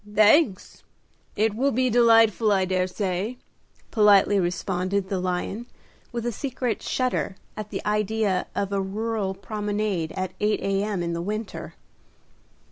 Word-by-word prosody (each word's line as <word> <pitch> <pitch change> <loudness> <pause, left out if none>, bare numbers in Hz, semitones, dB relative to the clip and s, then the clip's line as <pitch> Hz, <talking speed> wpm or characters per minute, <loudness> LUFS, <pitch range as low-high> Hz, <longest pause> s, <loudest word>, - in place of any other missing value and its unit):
"Thanks; 215 - +3 0.5
it 215 0 +2
will 270 +5 +2
be 255 +1 +1
delightful, 225 -2 +5
I 190 -2 +3
dare 185 0 0
say," 195 +4 -2 0.5
politely 205 -2 +5
responded 185 +2 -1
the 195 - -1
lion, 185 +6 -3 0.4
with 235 -1 -4
a 240 - 0
secret 250 -1 -3
shudder 255 -6 -1 0.2
at 215 -1 -6
the - - -5
idea 210 -2 0
of 200 0 -1
a 195 - +1
rural 205 0 -2
promenade 205 -4 -2
at 185 0 -3
8 210 0 +1
A.M. 195 -1 -1
in 170 0 -2
the 170 - -2
winter. 210 +3 -5
205 Hz, 135 wpm, -25 LUFS, 190-225 Hz, 0.5 s, delightful